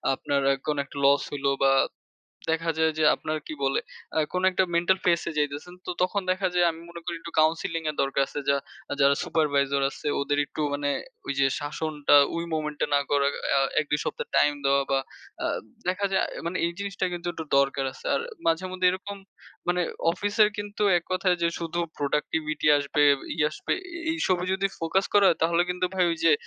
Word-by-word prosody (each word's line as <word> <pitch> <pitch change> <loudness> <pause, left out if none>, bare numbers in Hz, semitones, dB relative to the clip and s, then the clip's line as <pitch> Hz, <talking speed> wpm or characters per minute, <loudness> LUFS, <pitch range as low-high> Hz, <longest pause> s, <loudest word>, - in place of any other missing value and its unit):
আপনার 140 +1 -1
এক 135 - -4
কোন 150 -1 0
একটা 140 - -12
loss 140 +1 +5
হইল 140 -1 -5 0.2
বা 135 - +5 0.8
দেখা 165 0 0
যায় 160 0 +3
যে 155 - +3
আপনার 155 - -3
কি - - -5
বলে 135 - +1 0.4
আ - - +3
কোন 180 - -1
একটা 185 0 +2
mental 175 +3 +3
phase 170 -2 +3
এ - - -6
যাইতেছেন। 145 +4 -2
তো - - -2
তখন 185 +2 +1
দেখা 185 +1 +1
যায় 175 -1 +4
আমি 165 0 -9
মনে 170 0 -9
করি 175 -1 -3
একটু 170 - -8
counseling 165 +1 +1
এর 150 - -9
দরকার 135 0 +1
আছে। 145 - -5
যা 140 - +4 0.4
যারা 140 0 +5
supervisor 140 -3 +1
আছে - - -10
ওদের 145 +1 0
একটু 145 - -7
মানে 145 0 -1 0.4
ওই - - -1
যে 135 - +5
শাসনটা 150 0 0 0.2
ওই 170 0 -2
moment 150 -1 -3
এ - - -1
না 140 - +5
করা 140 -1 +3 0.3
আ - - +3 0.2
১-২ 150 -1 -1
সপ্তাহ 475 0 -3
time 145 0 +4
দেওয়া 140 0 +3
বা 135 - +3 0.5
আ - - +2 0.4
দেখা 185 +2 0
যায় 190 - +3
আ - - -12 0.2
মানে 175 +2 -2
এই 170 - -2
জিনিসটা 200 -1 -3
কিন্তু 175 0 -5
একটু 165 -1 -6
দরকার 140 0 +1
আছে। - - -11
আর - - +1 0.3
মাঝেমধ্যে 185 +2 +1
এরকম 190 +2 -5 0.5
মানে 180 0 +2 0.3
অফিসের 205 +3 +3
কিন্তু 205 0 -4 0.2
এক 170 - -12
কথায় 185 -1 +2
যে 170 - +3
শুধু 170 +1 -2 0.2
productivity 150 +2 -1
আসবে, 145 +1 0 0.3
ই - - -3
আসবে - - -3 0.4
এই 330 - -1
সবই 180 -1 +1
যদি 195 +1 +1
focus 165 +4 +1
করা 205 -1 +6
হয়, 165 - +2
তাহলে 170 +1 +3
কিন্তু 180 0 0
ভাই 185 -1 +3
ওই - - -3
যে 165 - +6
165 Hz, 200 wpm, -26 LUFS, 145-180 Hz, 0.8 s, করা